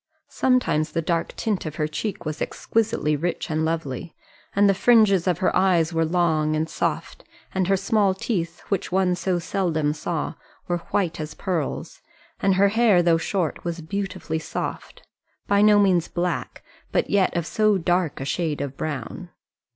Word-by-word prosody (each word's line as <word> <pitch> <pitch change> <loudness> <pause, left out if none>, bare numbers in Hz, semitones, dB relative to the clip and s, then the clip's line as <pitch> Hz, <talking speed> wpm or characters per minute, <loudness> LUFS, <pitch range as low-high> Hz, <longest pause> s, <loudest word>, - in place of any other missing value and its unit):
Sometimes 245 - +1
the 165 - 0
dark 165 0 -1
tint 210 -4 -1
of 155 - -6
her 150 -1 0
cheek 175 +5 -4
was 155 0 -4
exquisitely 210 -9 0
rich 170 +2 -3
and 155 0 0
lovely, 160 -2 -3 0.4
and 200 +1 +5
the 195 - +5
fringes 200 -4 +4
of 180 -3 +2
her 185 - +1
eyes 180 -3 +3
were 165 0 +2
long 160 -3 +1
and 155 +1 0
soft, 160 - -3 0.3
and 185 -1 0
her 195 0 +3
small 200 0 +2
teeth, 175 -5 -3
which 195 -3 -1
one 185 -1 +2
so 180 +1 -1
seldom 165 -4 0
saw, 155 +1 -3 0.3
were 175 -1 0
white 175 -5 0
as 155 -1 -5
pearls, 175 -7 -3 0.4
and 195 -1 +2
her 200 +1 +4
hair, 215 -4 +4
though 165 -1 +3
short, 170 -1 -2
was 170 -1 -4
beautifully 185 -2 -3
soft - - -6 0.4
by 200 0 +3
no 210 0 +6
means 185 -5 +3
black, 175 +1 -3 0.3
but - - 0
yet 195 -3 +2
of 170 - -1
so 215 +2 +2
dark 175 -2 0
a 135 - -4
shade 155 0 -1
of 140 -1 -4
brown. 155 +5 -5
175 Hz, 170 wpm, -24 LUFS, 160-195 Hz, 0.4 s, no